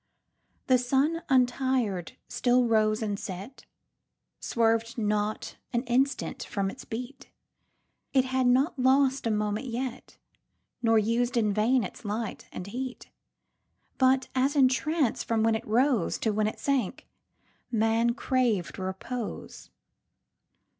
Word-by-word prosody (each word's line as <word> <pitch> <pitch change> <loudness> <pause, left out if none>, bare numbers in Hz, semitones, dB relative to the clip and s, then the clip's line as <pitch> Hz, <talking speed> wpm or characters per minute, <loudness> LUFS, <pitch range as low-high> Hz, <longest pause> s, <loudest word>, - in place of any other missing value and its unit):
The 255 -2 +4
sun, 275 +7 +1
untir'd, 250 - +1
still 245 0 +2
rose 215 -1 +2
and 205 -2 -2
set,—Swerv'd 225 +2 -4
not 210 -1 -1 0.2
an 240 0 +1
instant 265 +3 0
from 195 -2 -2
its 260 - -11
beat; 250 +4 -7 0.8
It 265 -1 +3
had 260 -1 +1
not 265 +4 +2
lost 265 0 +3
a - - +1
moment 210 +3 -1
yet, 250 +1 -5 0.6
Nor 225 -1 +4
used 235 +3 +1
in 210 -3 +2
vain 230 +4 +2
its 185 - -8
light 215 +1 -4
and 180 - -6
heat; 250 +5 -6 0.9
But, 260 0 +3
as 265 +3 +1
in 265 -3 +6
trance, 295 0 0
from 225 -1 0
when 225 0 +3
it 220 - -2
roseTo 225 -2 +1
when 215 0 +1
it 215 - -4
sank, 270 -8 -1 0.6
man 230 +1 +2
crav'd 240 -10 0
repose. 190 +5 -6
240 Hz, 120 wpm, -28 LUFS, 215-260 Hz, 0.9 s, in